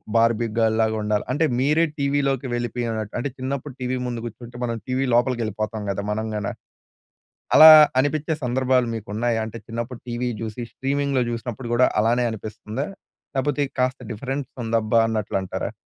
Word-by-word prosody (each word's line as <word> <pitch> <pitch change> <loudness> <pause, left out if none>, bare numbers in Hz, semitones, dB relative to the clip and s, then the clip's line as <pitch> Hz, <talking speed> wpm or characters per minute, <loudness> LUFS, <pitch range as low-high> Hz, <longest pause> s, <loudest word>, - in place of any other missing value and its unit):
Barbie 115 0 +3
girl 110 -1 +3
లాగా 110 0 +1
ఉండాలి 105 -1 0
అంటే 160 +4 +2
మీరే 150 +5 +3
టీవీ 140 0 +1
లోకి 135 -1 -2
వెళ్ళిపోయినట్టు 120 -3 -3
అంటే 140 - -2
చిన్నప్పుడు 135 +1 -4
టీవీ 130 0 -1
ముందు 120 -1 -3
గూర్చుంటే 120 +1 -9
మనం 115 -1 -1
టీవీ 130 +1 0
లోపలికెళ్ళిపోతాం 110 -3 0
గదా! 100 +1 -3
మనం 110 +1 -2
గాన. 105 -1 -2 1.1
అలా 160 0 +12 0.3
అనిపించే 155 +3 0
సందర్భాలు 125 0 +2
మీకున్నాయా? 110 +2 -1
అంటే 110 +1 -7
చిన్నప్పుడు 115 +1 -5
టీవీ 120 +1 -2
జూసి 110 +2 -5
స్ట్రీమింగ్‌లో 140 -1 0
జుసినప్పుడు 120 +1 -5
గూడా 125 +1 +5
అలానే 120 +3 +2
అనిపిస్తుందా? 110 +4 -5 0.5
లేపోతే 145 +2 +1 0.2
కాస్త 130 +1 +1
డిఫరెన్స్ 135 +4 -4
ఉందబ్బా 115 0 +1
అన్నట్లంటారా? 100 -4 -2
120 Hz, 145 wpm, -23 LUFS, 110-130 Hz, 1.1 s, అలా